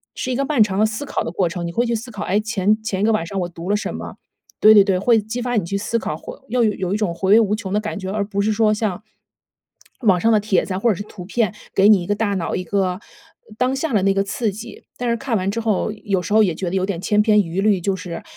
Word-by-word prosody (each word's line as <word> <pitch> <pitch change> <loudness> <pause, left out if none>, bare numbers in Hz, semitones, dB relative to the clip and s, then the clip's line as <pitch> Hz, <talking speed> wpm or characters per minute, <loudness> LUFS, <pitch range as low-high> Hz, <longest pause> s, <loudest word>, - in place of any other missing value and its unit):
是 255 - -3
一 - - 0
个 275 - 0
漫 275 -5 +3
长 195 -2 -2
的 215 - +4
思 220 +6 -5
考 - - -2
的 - - -4
过 180 0 0
程， 170 0 -4
你 - - -4
会 235 +7 0
去 235 - -1
思 230 +2 -4
考， 210 -5 -6
哎， 200 - +1
前 215 -1 0
前 195 -3 -3
一 - - +1
个 225 - +3
晚 215 -6 +1
上 195 +2 -3
我 175 - -2
读 170 +1 -8
了 205 - +3
什 210 - -3
么？ - - -7 0.5
对， 215 - +8
对， 205 -2 +8
对， 195 -2 +1
会 225 +4 +3
激 220 +4 -5
发 245 0 -2
你 195 - 0
去 200 +3 -2
思 220 +3 -1
考， 155 - -3
会 - - -9
又 245 +1 +1
有 195 -4 0
一 - - +1
种 210 -5 -1
回 190 +3 -1
味 220 - +8
无 210 -2 +2
穷 210 -4 -6
的 210 - +2
感 210 -1 -5
觉， 190 -1 -5
而 210 +1 -1
不 200 0 -2
是 215 +2 +1
说 215 0 +3
像， 210 -2 -2 1.0
网 195 -7 +3
上 225 +5 +2
的 215 - +4
帖 205 -3 +1
子 190 - -4
啊， 185 - -2
或 235 - +2
者 210 - +2
是 205 - -6
图 195 -3 -11
片， 215 +1 0 0.2
给 195 +2 +5
你 205 -4 +6
一 175 - -6
个 205 - +1
大 205 -1 -1
脑 175 -3 -2
一 185 - -2
个 185 0 -1 0.6
当 255 +1 +1
下 275 0 -2
的 205 - +3
那 195 - +3
个 195 0 +1
刺 210 +2 -2
激， 225 +4 -10
但 245 - -3
是 235 - +2
看 245 -3 -1
完 190 +1 -1
之 230 - -3
后， 215 -2 0
有 195 -2 0
时 180 +4 -4
候 220 - +6
也 185 -6 +2
觉 180 +1 -3
得 185 - -3
有 190 - +1
点 190 -4 -3
千 210 +2 +2
篇 210 -1 +4
一 180 0 -3
律， 205 -2 +3
就 195 +2 0
是， 180 -3 -7
205 Hz, 330 characters per minute, -20 LUFS, 190-220 Hz, 1.0 s, 对